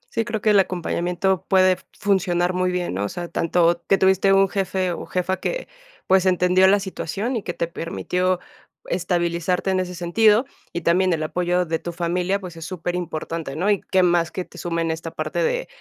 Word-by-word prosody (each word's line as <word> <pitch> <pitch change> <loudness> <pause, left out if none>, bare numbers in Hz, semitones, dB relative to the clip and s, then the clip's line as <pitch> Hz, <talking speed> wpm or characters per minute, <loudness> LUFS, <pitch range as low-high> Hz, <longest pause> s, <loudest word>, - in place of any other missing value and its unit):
Sí, 225 - +1
creo 225 -3 -3
que 215 - +3
el 205 - +6
acompañamiento 180 0 0
puede 185 -1 +4 0.2
funcionar 180 -3 +1
muy 185 0 0
bien, 180 - -2
¿no?, 100 +2 -1
o 100 - -3
sea, 175 -1 -6
tanto 170 0 +1
que 195 - +5
tuviste 190 +1 +3
un 195 0 +5
jefe 185 -1 -1
o 170 - -6
jefa 185 +1 -1
que, - - -3 0.4
pues, 190 0 +3
entendió 180 +1 +4
la 200 +2 +5
situación 200 +5 -3
y 225 - -1
que 175 - -5
te 170 - -1
permitió 180 +2 -1 0.5
estabilizarte 175 +1 0
en 185 - +1
ese 180 -1 -3
sentido, 210 +7 +3 0.3
y 170 - -4
también 180 +2 +3
el 155 -1 -1
apoyo 180 +2 0
de 165 0 -2
tu 175 - -5
familia, 180 +3 -1
pues, 180 -4 -9
es 165 - -7
superimportante, 165 -4 -4
¿no?, 190 +6 +1
y 200 - +1
qué 185 -1 +4
más 175 -2 +2
que 185 - -4
te - - -13
sumen 170 -1 -1
esta 160 +1 -5
parte - - -3
de - - 0
180 Hz, 195 wpm, -22 LUFS, 170-190 Hz, 0.5 s, el